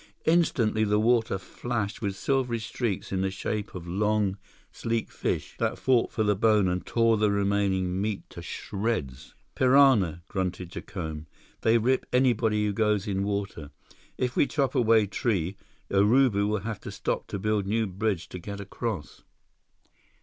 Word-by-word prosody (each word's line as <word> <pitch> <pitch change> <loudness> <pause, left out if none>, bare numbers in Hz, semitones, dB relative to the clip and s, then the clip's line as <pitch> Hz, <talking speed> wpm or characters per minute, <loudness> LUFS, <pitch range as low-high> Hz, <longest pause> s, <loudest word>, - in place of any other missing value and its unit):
Instantly, 125 -10 +2
the 105 0 +2
water 115 -2 +2
flashed 105 +3 -4
with 100 -3 -2
silvery 125 +1 0
streaks 110 -2 -3
in 95 -1 0
the 95 - +1
shape 105 +2 -4
of 85 -1 -7
long, 105 +1 +1 0.4
sleek 115 0 -2
fish - - -2
that - - 0
fought 125 -3 +2
for 110 - 0
the 105 -1 +2
bone 105 -1 +3
and 90 0 -2
tore 115 -1 +3
the 105 0 +3
remaining 100 -2 +1
meat 105 -1 -3
to - - -8
shreds. 100 - -4 0.2
"Piranha," 125 - +4
grunted 90 -3 -3
Jacome. 80 -5 -6 0.3
"They 115 +1 +4
rip 125 +3 +1
anybody 115 -4 +2
who 105 - 0
goes 105 -2 +1
in 95 -1 -1
water. 100 -7 -3 0.5
If 125 -1 -1
we - - +3
chop 135 -4 0
away 115 -5 +4
tree, 100 -3 -1 0.4
Urubu 105 +1 +4
will 105 -1 0
have 110 0 -4
to - - -8
stop - - -3
to - - -4
build 105 0 0
new 110 +2 +1
bridge 100 -2 -2
to 90 - -7
get 100 +3 -7
across." 100 -1 -5
105 Hz, 155 wpm, -27 LUFS, 95-115 Hz, 0.5 s, Piranha